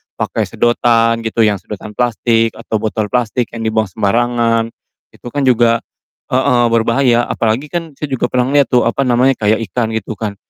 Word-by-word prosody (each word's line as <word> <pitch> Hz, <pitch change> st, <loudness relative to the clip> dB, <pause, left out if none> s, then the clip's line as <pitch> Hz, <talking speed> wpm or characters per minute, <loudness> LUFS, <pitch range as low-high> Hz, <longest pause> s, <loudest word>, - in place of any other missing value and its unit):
pakai -, -, -2 dB
sedotan 115 Hz, -1 st, +2 dB
gitu 115 Hz, 0 st, +1 dB
yang 105 Hz, -3 st, +1 dB
sedotan 105 Hz, 0 st, -8 dB
plastik 115 Hz, -2 st, +1 dB
atau 110 Hz, -1 st, -3 dB
botol 110 Hz, -1 st, -2 dB
plastik 125 Hz, 0 st, -1 dB
yang 115 Hz, -1 st, -5 dB
dibuang 110 Hz, -2 st, 0 dB
sembarangan, 115 Hz, +2 st, +1 dB, 0.4 s
itu -, -, -13 dB
kan 145 Hz, -1 st, -1 dB
juga 120 Hz, -2 st, +3 dB, 0.5 s
heeh, 125 Hz, -2 st, +3 dB
berbahaya 120 Hz, +1 st, +2 dB
apalagi 115 Hz, +6 st, -1 dB
kan 165 Hz, -3 st, -4 dB
saya 150 Hz, -, -3 dB
juga 130 Hz, -, 0 dB
pernah 130 Hz, +2 st, 0 dB
liat 140 Hz, -2 st, +4 dB
tuh, 120 Hz, -2 st, +3 dB
apa 135 Hz, +3 st, 0 dB
namanya, 125 Hz, +2 st, +3 dB
kayak 110 Hz, +1 st, +2 dB
ikan 115 Hz, -2 st, -1 dB
gitu 110 Hz, 0 st, -4 dB
kan, 105 Hz, -1 st, -4 dB
115 Hz, 170 wpm, -16 LUFS, 110-125 Hz, 0.5 s, liat